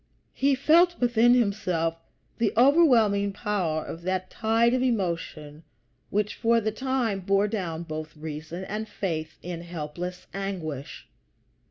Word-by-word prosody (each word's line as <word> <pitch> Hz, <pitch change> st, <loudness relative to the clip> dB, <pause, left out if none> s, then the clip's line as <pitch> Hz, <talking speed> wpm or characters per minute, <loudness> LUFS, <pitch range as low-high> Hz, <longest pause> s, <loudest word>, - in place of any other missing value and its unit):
He 275 Hz, +1 st, +2 dB
felt 340 Hz, +6 st, +4 dB
within 240 Hz, 0 st, +4 dB
himself 185 Hz, -8 st, 0 dB, 0.4 s
the 230 Hz, -, +2 dB
overwhelming 235 Hz, -8 st, +5 dB
power 185 Hz, -8 st, -1 dB
of 165 Hz, -, -7 dB
that 185 Hz, +1 st, -2 dB
tide 230 Hz, +2 st, +2 dB
of 255 Hz, -, +1 dB
emotion 170 Hz, -, -2 dB, 0.5 s
which 210 Hz, +1 st, 0 dB
for 230 Hz, 0 st, +2 dB
the 215 Hz, -1 st, -1 dB
time 245 Hz, -3 st, -1 dB
bore 195 Hz, +2 st, +2 dB
down 175 Hz, -6 st, -3 dB
both 155 Hz, -1 st, -7 dB
reason 155 Hz, +3 st, -6 dB
and 215 Hz, +3 st, -5 dB
faith 160 Hz, -5 st, -4 dB
in 175 Hz, -1 st, -5 dB
helpless 175 Hz, +2 st, -6 dB
anguish. 175 Hz, -8 st, -5 dB
195 Hz, 130 wpm, -26 LUFS, 165-230 Hz, 0.5 s, overwhelming